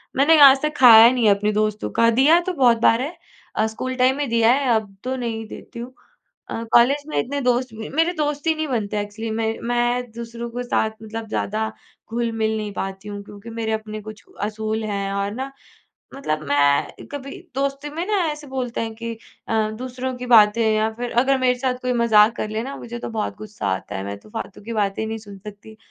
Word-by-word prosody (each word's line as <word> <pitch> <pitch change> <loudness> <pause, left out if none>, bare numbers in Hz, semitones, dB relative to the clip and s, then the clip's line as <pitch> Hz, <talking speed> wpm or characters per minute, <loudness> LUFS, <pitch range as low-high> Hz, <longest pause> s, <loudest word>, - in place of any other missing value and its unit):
मैंने 300 +4 +5
आज 270 -1 +9
तक 305 0 -1
खाया 230 -3 +9
ही 235 - +7
नहीं 245 -3 +1
है 200 - +6
अपने 210 +1 0
दोस्तों 215 0 -1
का, 230 0 +3
दिया 285 +8 +5
तो 370 +1 -3
बहुत 250 -7 +4
बार 230 +1 +4
है, 310 +6 -5 0.4
अ, 215 - +2
स्कूल 255 +4 -4
टाइम 255 +1 +3
में 290 -1 -1
दिया 230 0 +4
है 275 0 0
अब 210 -3 -3
तो 260 +1 -2
नहीं 230 -3 -4
देती 235 - -10
हूँ। 245 +2 -7 0.6
अ, 230 - -4
कॉलेज 270 +5 +5
में - - -4
इतने 285 +3 -2
दोस्त 250 0 +1
म 220 0 -7
मेरे 330 +2 +3
दोस्त 295 -2 -2
ही 320 - +3
नहीं 315 0 -2
बनते 215 -5 -2
एक्चुअली 210 +2 -5
मैं 220 0 -1
मैं 240 0 0
दूसरों 235 0 -6
के 245 +1 -4
साथ 220 -2 0
मतलब 220 +1 -6
ज़्यादा 220 +1 -2 0.4
घुल-मिल 225 -2 -1
नहीं 210 -1 -4
पाती 195 +1 -5
हूँ 205 0 -6
क्योंकि 205 +2 -11
मेरे 225 -1 -3
अपने 215 0 -4
कुछ 215 +1 -10 0.2
असूल 215 +1 -2
हैं 200 -2 -2
और 200 0 -1
ना 265 +4 -5 0.6
मतलब 155 - -3
मैं 145 0 +1
कभी 275 +4 -6 0.2
दोस्ती 275 +1 -2
में 335 +2 -2
ना 425 0 +1
ऐसे 300 0 -7
बोलते 255 -3 -3
हैं 225 -1 -3
कि 230 +1 -5 0.4
अ, 220 -1 +1
दूसरों 255 +1 -4
की 250 0 -6
बातें 230 -1 +6
या 215 +1 +1
फिर 240 +1 -5
अगर 270 +1 +2
मेरे 255 -1 +3
साथ 255 0 0
कोई 250 0 0
मज़ाक 230 -2 +4
कर 215 - -3
ले 215 +1 -3
ना 275 +2 -6
मुझे 240 0 -7
तो - - -5
बहुत 220 -2 -3
गुस्सा 210 0 -7
आता 95 0 -3
है, 95 - -4
मैं 100 0 -5
तो 105 - -19
फालतू 195 - -7
की 230 +2 -6
बातें 205 0 -1
नहीं 225 0 -4
सुन 205 -2 -12
सकती 210 +2 -12
230 Hz, 220 wpm, -22 LUFS, 215-255 Hz, 0.6 s, आज